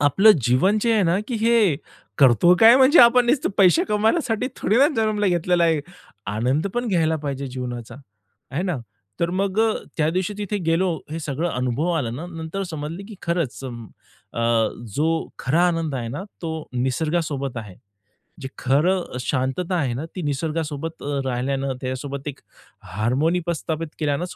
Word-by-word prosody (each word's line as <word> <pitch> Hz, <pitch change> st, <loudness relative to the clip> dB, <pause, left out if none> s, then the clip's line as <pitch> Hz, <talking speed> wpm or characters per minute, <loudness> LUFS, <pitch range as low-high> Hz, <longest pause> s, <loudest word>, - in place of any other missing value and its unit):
आपलं 170 Hz, +10 st, +6 dB
जीवन 135 Hz, -, +3 dB
जे 230 Hz, +1 st, +2 dB
आहे 215 Hz, -, +3 dB
ना, 175 Hz, +1 st, +2 dB
की 245 Hz, -, -2 dB
हे 225 Hz, -8 st, +3 dB, 0.4 s
करतो 140 Hz, +6 st, +6 dB
काय, 230 Hz, +2 st, +9 dB
म्हणजे 270 Hz, +5 st, +6 dB
आपण 240 Hz, +1 st, +6 dB
नुसतं 255 Hz, 0 st, +1 dB
पैसे 200 Hz, -, +5 dB
कमवण्यासाठी 225 Hz, -, +1 dB
थोडी 215 Hz, -, +1 dB
ना 280 Hz, -, +7 dB
जन्माला 215 Hz, -2 st, +1 dB
घेतलेलं 175 Hz, 0 st, +1 dB
आहे? 160 Hz, -2 st, +2 dB, 0.5 s
आनंद 130 Hz, -, 0 dB
पण 240 Hz, 0 st, -1 dB
घ्यायला 160 Hz, -5 st, +2 dB
पाहिजे 140 Hz, -2 st, -4 dB
जीवनाचा, 125 Hz, -2 st, -6 dB, 0.6 s
है 175 Hz, -, 0 dB
ना? 180 Hz, -5 st, -1 dB, 0.4 s
तर 170 Hz, -, +1 dB
मग 195 Hz, +1 st, -1 dB
अ, 225 Hz, -1 st, +3 dB, 0.2 s
त्यादिवशी 175 Hz, +6 st, 0 dB
तिथे 205 Hz, 0 st, -2 dB
गेलो, 170 Hz, +2 st, +2 dB, 0.2 s
हे 160 Hz, -, -4 dB
सगळं 155 Hz, +3 st, -2 dB
अनुभव 125 Hz, +5 st, -1 dB
आला 140 Hz, -9 st, -1 dB
ना, 135 Hz, +9 st, -6 dB
नंतर 165 Hz, +2 st, -5 dB
समजलं, 165 Hz, +2 st, -6 dB
की 220 Hz, -, -9 dB
खरंच, 170 Hz, -6 st, -2 dB
अ, 115 Hz, -1 st, -10 dB, 0.6 s
जो 155 Hz, +2 st, +2 dB, 0.3 s
खरा 165 Hz, +7 st, +2 dB
आनंद 165 Hz, -4 st, -2 dB
आहे 120 Hz, -3 st, -3 dB
ना, 140 Hz, +9 st, -5 dB, 0.2 s
तो 165 Hz, -1 st, -3 dB, 0.2 s
निसर्गासोबत 140 Hz, +1 st, -1 dB
आहे. 105 Hz, -4 st, -7 dB, 0.7 s
जे 135 Hz, -, -4 dB
खरं 155 Hz, +4 st, +1 dB
शांतता 135 Hz, +8 st, -1 dB
आहे 140 Hz, -8 st, 0 dB
ना, 135 Hz, +6 st, -4 dB
ती 185 Hz, -, -4 dB
निसर्गासोबत 155 Hz, +1 st, -3 dB
अ, 145 Hz, 0 st, -2 dB
राहिल्यानं, 135 Hz, +2 st, -1 dB
त्याच्यासोबत 135 Hz, +2 st, -5 dB
एक 140 Hz, -, -9 dB, 0.6 s
हार्मोनी 135 Hz, -, +1 dB
प्रस्थापित 165 Hz, -1 st, -3 dB
केल्यानंच 155 Hz, +3 st, -2 dB
160 Hz, 160 wpm, -22 LUFS, 135-190 Hz, 0.7 s, काय